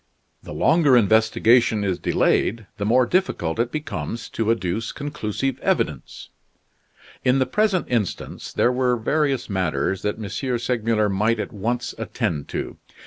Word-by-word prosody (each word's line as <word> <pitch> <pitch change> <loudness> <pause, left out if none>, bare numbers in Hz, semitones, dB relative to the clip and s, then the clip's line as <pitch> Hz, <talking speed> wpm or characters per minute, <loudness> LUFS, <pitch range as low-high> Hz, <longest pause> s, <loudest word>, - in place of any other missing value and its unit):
The - - -10
longer 150 -5 +4
investigation 110 +1 +3
is 95 -3 -1
delayed 110 +1 +1
the 100 - -2
more 125 +3 +4
difficult 120 - 0
it 120 +1 0
becomes 115 - -5
to 115 -1 -2
adduce 110 0 -1
conclusive 135 -3 -3
evidence. - - -2 0.9
In 130 +1 +3
the 130 - +2
present 200 +6 +1
instance 115 -6 -3
there 120 - +2
were 125 -1 +1
various 140 +2 0
matters 95 -2 -1
that 105 - -2
M. 120 +4 -3
Segmuller 115 -3 0
might 105 +3 +1
at 115 - -4
once 120 +4 -2
attend 75 -4 -2
to. - - -5
115 Hz, 140 wpm, -23 LUFS, 105-130 Hz, 0.9 s, longer